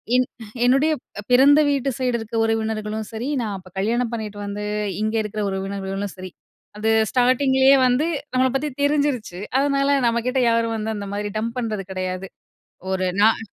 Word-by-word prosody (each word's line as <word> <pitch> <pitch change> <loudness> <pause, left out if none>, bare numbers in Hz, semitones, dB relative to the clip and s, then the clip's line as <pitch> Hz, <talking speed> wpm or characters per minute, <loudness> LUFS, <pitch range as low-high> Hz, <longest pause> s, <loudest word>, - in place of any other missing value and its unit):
என் 255 0 +3 0.4
என்னுடைய 275 +5 +4 0.4
பிறந்த 275 +4 +7
வீட்டு 275 -1 0
சைடு 250 -2 0
இருக்கிற 225 +1 -5
உறவினர்களும் 220 -1 -2
சரி, 225 +4 -4
நான் 210 -4 -3
அப்ப 185 0 -14
கல்யாணம் 230 +4 0
பண்ணிட்டு 210 -2 -5
வந்து 205 +1 -5 0.4
இங்க 215 +1 -1
இருக்கிற 210 0 -4
உறவினர்களும் 195 0 -4
சரி. 185 0 -8 0.5
அது 220 +1 0 0.2
ஸ்டார்ட்டிங்லேயே 265 +2 +4
வந்து 250 +5 +2 0.3
நம்மள 255 0 +3
பத்தி 295 +2 0
தெரிஞ்சிருச்சு. 285 -10 0 0.2
அதனால 280 0 +2
நம்மக்கிட்ட 235 +3 0
யாரும் 230 0 +1
வந்து 220 0 -2
அந்த 200 -1 -5
மாதிரி 205 0 -3
டம்ப் 230 +2 -3
பண்றது 215 -5 -3
கிடையாது. 185 0 -3 0.6
ஒரு 185 0 0 0.2
நான் 220 +1 +5
225 Hz, 150 wpm, -22 LUFS, 205-260 Hz, 0.6 s, பிறந்த